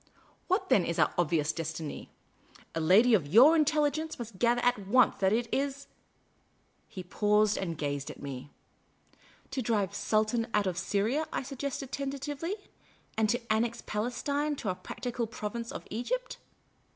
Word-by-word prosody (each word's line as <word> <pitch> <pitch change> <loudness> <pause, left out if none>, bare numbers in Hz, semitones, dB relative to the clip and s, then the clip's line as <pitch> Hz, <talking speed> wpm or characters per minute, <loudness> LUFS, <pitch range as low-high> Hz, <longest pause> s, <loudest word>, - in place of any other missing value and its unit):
What 375 +1 0
then 190 - +5
is 170 - -2
our - - +3
obvious 160 -2 +1
destiny? 160 -2 -5 0.6
A 165 - -2
lady 205 +9 +5
of 175 -9 +3
your 250 - +7
intelligence 310 0 +1
must 225 -5 -8
gather 240 0 +3
at 245 -6 +1
once 250 +3 +4
that 190 -1 +2
it 230 +2 +1
is 280 0 -1 0.5
?" - - -40
He 190 -4 -7
paused 210 +3 +2
and 170 -4 -3
gazed 145 -2 -3
at - - -9
me. 140 -1 -7 0.5
" - - -30
To 265 -1 -2
drive 215 -5 0
the 200 - -6
Sultan 220 +3 +1
out 210 -1 +3
of 180 -2 -1
Syria," 215 - 0
I - - -2
suggested 275 0 -5
tenta 275 0 -3
tively, 295 +6 -4 0.3
" - - -32
and 220 -1 +2
to 235 -1 0
annex 235 +2 -1
Palestine 280 +7 -1
to 220 - -4
our 185 - -1
practical 240 +3 -4
province 230 +2 -5
of - - -7
Egypt?" 485 - -3
225 Hz, 170 wpm, -30 LUFS, 190-275 Hz, 0.6 s, your